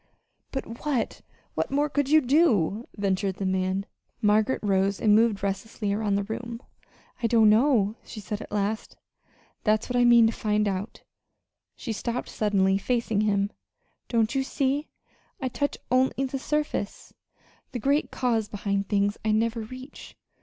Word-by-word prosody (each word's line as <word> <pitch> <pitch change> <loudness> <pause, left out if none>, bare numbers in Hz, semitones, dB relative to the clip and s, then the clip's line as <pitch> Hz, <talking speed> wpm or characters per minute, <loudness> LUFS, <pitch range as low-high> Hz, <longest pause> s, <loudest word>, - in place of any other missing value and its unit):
"But 240 -3 -6
what 280 -7 -1 0.3
what - - -1
more 290 +2 +1
could 285 -2 -1
you 310 +1 +6
do?" 240 - +2
ventured 195 -1 0
the 195 - -4
man. 190 +1 0 0.3
Margaret 215 +4 +2
rose, 195 0 +1
and 210 -2 +4
moved 215 -2 +3
restlessly 200 +1 -2
around 205 -1 0
the 200 - 0
room. 230 +2 -5 0.6
"I 230 - +2
don't 225 -2 +5
know," 220 -3 +3
she 220 - -9
said 210 +1 -5
at - - -10
last. 210 +1 -2 0.7
"That's 215 0 +2
what 250 - -2
I 245 - +4
mean 235 -1 +7
to 225 - +2
find 210 -1 0
out." 195 +2 -4 0.7
She 230 - -4
stopped 235 +3 -3
suddenly, 195 -2 +2
facing 230 -2 0
him. 205 -1 +1 0.6
"Don't 230 -1 +1
you 270 - +1
see? 275 +2 -1 0.5
I 260 - -2
touch 285 +3 -2
only 260 +1 +2
the 270 +1 -3
surface. 300 -7 -3 0.6
The - - -3
great 280 +5 +1
cause 230 -4 0
behind 200 -1 -2
things 205 0 +1
I 220 - +1
never 230 +2 +1
reach. 255 +5 -10
220 Hz, 155 wpm, -26 LUFS, 200-255 Hz, 0.7 s, mean